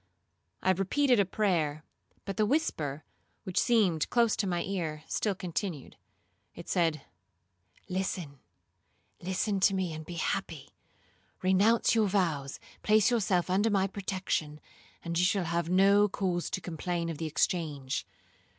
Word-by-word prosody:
I 190 Hz, -, +4 dB
repeated 235 Hz, +7 st, +2 dB
a 200 Hz, -, +4 dB
prayer, 165 Hz, -7 st, 0 dB, 0.4 s
but 195 Hz, -, -4 dB
the 215 Hz, -, +2 dB
whisper, 155 Hz, -, -1 dB, 0.4 s
which 185 Hz, -, -1 dB
seemed 200 Hz, -10 st, +2 dB
close 235 Hz, -3 st, +3 dB
to 200 Hz, -, 0 dB
my 175 Hz, -2 st, -1 dB
ear, 160 Hz, -6 st, -3 dB
still 205 Hz, -3 st, -1 dB
continued. 175 Hz, -4 st, -4 dB, 0.6 s
It -, -, -10 dB
said, 165 Hz, -5 st, +1 dB, 0.8 s
'Listen,—listen 185 Hz, -, -5 dB
to 195 Hz, +1 st, +4 dB
me, 185 Hz, -3 st, -1 dB
and 155 Hz, 0 st, -6 dB
be 175 Hz, +2 st, -8 dB
happy. 165 Hz, -, -3 dB, 0.7 s
Renounce 200 Hz, +5 st, +4 dB
your 220 Hz, -2 st, +3 dB
vows, 165 Hz, -8 st, -1 dB, 0.2 s
place 215 Hz, +2 st, +4 dB
yourself 190 Hz, -6 st, +1 dB
under 195 Hz, +4 st, +2 dB
my 195 Hz, -2 st, +2 dB
protection, 185 Hz, -6 st, -3 dB, 0.5 s
and 170 Hz, 0 st, -1 dB
you -, -, +3 dB
shall 190 Hz, 0 st, +2 dB
have 170 Hz, 0 st, -1 dB
no 200 Hz, +3 st, +5 dB
cause 180 Hz, -3 st, -1 dB
to 185 Hz, -, -3 dB
complain 170 Hz, 0 st, -3 dB
of 160 Hz, -3 st, -5 dB
the 160 Hz, -, -2 dB
exchange. 150 Hz, -4 st, -1 dB
185 Hz, 135 wpm, -30 LUFS, 165-200 Hz, 0.8 s, no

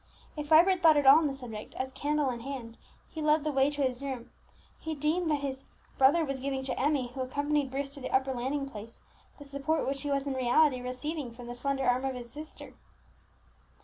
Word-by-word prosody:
If 300 Hz, -1 st, -5 dB
Vibert 345 Hz, +4 st, +5 dB
thought 315 Hz, -2 st, +6 dB
at 290 Hz, -, +2 dB
all 275 Hz, +3 st, +9 dB
on 320 Hz, -, +1 dB
the 275 Hz, -, -2 dB
subject, 230 Hz, -5 st, -8 dB
as, 260 Hz, 0 st, -3 dB
candle 290 Hz, 0 st, 0 dB
in 240 Hz, -, -5 dB
hand, 240 Hz, -2 st, -7 dB, 0.4 s
he 315 Hz, -, -6 dB
led 300 Hz, 0 st, +3 dB
the 305 Hz, -, 0 dB
way 270 Hz, 0 st, +3 dB
to 290 Hz, -1 st, -2 dB
his 255 Hz, -1 st, -1 dB
room, 265 Hz, -4 st, -5 dB, 0.5 s
he 320 Hz, 0 st, -4 dB
deemed 315 Hz, +4 st, 0 dB
that 295 Hz, -2 st, +1 dB
his 270 Hz, -1 st, -4 dB, 0.3 s
brother 290 Hz, +5 st, +5 dB
was 275 Hz, -2 st, -3 dB
giving 265 Hz, 0 st, -2 dB
to 265 Hz, -, -3 dB
Emmie, 275 Hz, -2 st, +1 dB
who 265 Hz, -, -4 dB
accompanied 285 Hz, +2 st, 0 dB
Bruce 275 Hz, +1 st, -4 dB
to 285 Hz, -, -8 dB
the 255 Hz, -, -5 dB
upper 265 Hz, 0 st, +1 dB
landing 270 Hz, +3 st, -2 dB
place, 225 Hz, -2 st, -10 dB, 0.4 s
the 285 Hz, -, -11 dB
support 280 Hz, +3 st, -1 dB
which 275 Hz, 0 st, -2 dB
he 290 Hz, -, -4 dB
was 275 Hz, 0 st, 0 dB
in 280 Hz, -, -2 dB
reality 260 Hz, +1 st, +3 dB
receiving 255 Hz, +3 st, -4 dB
from 240 Hz, +1 st, -11 dB
the 240 Hz, -, -6 dB
slender 270 Hz, +2 st, -2 dB
arm 250 Hz, +1 st, +2 dB
of 265 Hz, -1 st, -2 dB
his 240 Hz, -1 st, -8 dB
sister. 310 Hz, +1 st, -10 dB
275 Hz, 220 wpm, -30 LUFS, 255-295 Hz, 0.5 s, all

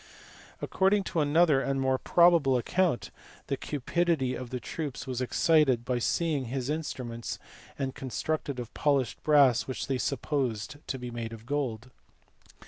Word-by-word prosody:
According 195 Hz, +1 st, +2 dB
to 170 Hz, -, -2 dB
another 150 Hz, -1 st, +4 dB
and 135 Hz, 0 st, -1 dB
more 130 Hz, -1 st, +1 dB
probable 170 Hz, -7 st, +4 dB
account, 175 Hz, +3 st, 0 dB, 0.3 s
the -, -, -1 dB
cupidity 150 Hz, -1 st, 0 dB
of 130 Hz, -2 st, -6 dB
the 125 Hz, -, -4 dB
troops 140 Hz, +2 st, -5 dB
was 130 Hz, -2 st, -3 dB
excited 130 Hz, -2 st, +3 dB
by 125 Hz, 0 st, 0 dB
seeing 150 Hz, +1 st, 0 dB
his 130 Hz, +3 st, -3 dB
instruments, 125 Hz, -7 st, -4 dB, 0.6 s
constructed 140 Hz, +1 st, -3 dB
of 120 Hz, -2 st, -7 dB
polished 140 Hz, -4 st, 0 dB
brass 140 Hz, -5 st, +4 dB
which 130 Hz, -, -3 dB
they 135 Hz, -2 st, -1 dB
supposed 135 Hz, -3 st, -2 dB
to 135 Hz, -, -2 dB
be 125 Hz, -1 st, -6 dB
made 115 Hz, -1 st, -5 dB
of 115 Hz, 0 st, -11 dB
gold. 130 Hz, -3 st, -3 dB
135 Hz, 140 wpm, -29 LUFS, 125-150 Hz, 0.6 s, another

